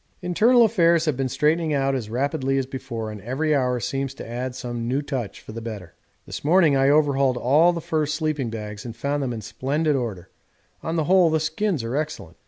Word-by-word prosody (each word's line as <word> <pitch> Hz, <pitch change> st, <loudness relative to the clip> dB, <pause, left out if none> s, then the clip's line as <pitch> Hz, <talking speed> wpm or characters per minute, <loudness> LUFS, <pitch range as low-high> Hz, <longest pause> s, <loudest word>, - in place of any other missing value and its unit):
Internal 230 Hz, +7 st, +4 dB
affairs 170 Hz, -6 st, +3 dB
have 155 Hz, -4 st, +1 dB
been 135 Hz, 0 st, -1 dB
straightening 155 Hz, +3 st, +1 dB
out 135 Hz, 0 st, +1 dB
as 120 Hz, -5 st, -3 dB
rapidly 135 Hz, +2 st, -1 dB
as 135 Hz, -, 0 dB
before, 115 Hz, -4 st, -5 dB
and 105 Hz, -2 st, -9 dB
every 135 Hz, +8 st, -1 dB
hour 125 Hz, -3 st, +1 dB
seems 135 Hz, +2 st, -3 dB
to -, -, -8 dB
add 125 Hz, +2 st, -4 dB
some 120 Hz, -2 st, -4 dB
new 130 Hz, +3 st, 0 dB
touch 130 Hz, -7 st, -4 dB
for -, -, -11 dB
the 115 Hz, +1 st, -7 dB
better. 105 Hz, -7 st, -7 dB, 0.3 s
This -, -, -7 dB
morning 160 Hz, -1 st, +4 dB
I 135 Hz, 0 st, +3 dB
overhauled 140 Hz, -3 st, +3 dB
all 150 Hz, +8 st, +4 dB
the 170 Hz, -1 st, -4 dB
fur 155 Hz, -1 st, -1 dB
sleeping 150 Hz, -4 st, -1 dB
bags 105 Hz, -2 st, -6 dB
and 115 Hz, -2 st, -7 dB
found 140 Hz, +4 st, -2 dB
them 130 Hz, -3 st, -2 dB
in 115 Hz, -2 st, -5 dB
splendid 140 Hz, +8 st, -1 dB
order 105 Hz, -8 st, -4 dB, 0.5 s
on 160 Hz, -, -3 dB
the 160 Hz, -, +1 dB
whole 180 Hz, +1 st, +4 dB
the 160 Hz, 0 st, +1 dB
skins 160 Hz, -, -1 dB
are 115 Hz, +3 st, -3 dB
excellent. 155 Hz, +1 st, -4 dB
135 Hz, 210 wpm, -23 LUFS, 120-155 Hz, 0.5 s, Internal